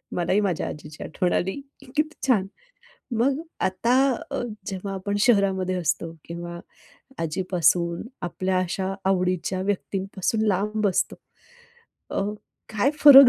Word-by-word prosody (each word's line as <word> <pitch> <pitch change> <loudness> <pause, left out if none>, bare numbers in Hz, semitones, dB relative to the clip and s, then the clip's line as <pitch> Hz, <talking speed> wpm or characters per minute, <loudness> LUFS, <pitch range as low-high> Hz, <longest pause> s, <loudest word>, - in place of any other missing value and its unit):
मलाही 180 +3 +2
माझ्या 185 -4 0
आजीची 150 0 -7
आठवण 180 +2 0
आली 190 +2 +1 0.3
की - - -14
किती 305 +1 +1
छान! 200 -7 +3 0.7
मग 265 +3 +3 0.2
आता 190 +6 +1 0.4
अ, 275 - -1 0.2
जेव्हा 195 0 -4
आपण 200 +2 -2
शहरामध्ये 195 -5 +3
असतो 165 -1 -1
किंवा 170 0 -6 0.6
आजीपासून 170 0 +1 0.2
आपल्या 185 +2 0
अशा 190 +2 -1
आवडीच्या 185 -1 +1
व्यक्तींपासून 195 +2 -1
लांब 210 +2 +1
असतो, 185 - 0 0.9
अ, - - 0 0.5
काय 220 +7 +3
फरक 275 -3 +12
190 Hz, 115 wpm, -25 LUFS, 180-210 Hz, 0.9 s, फरक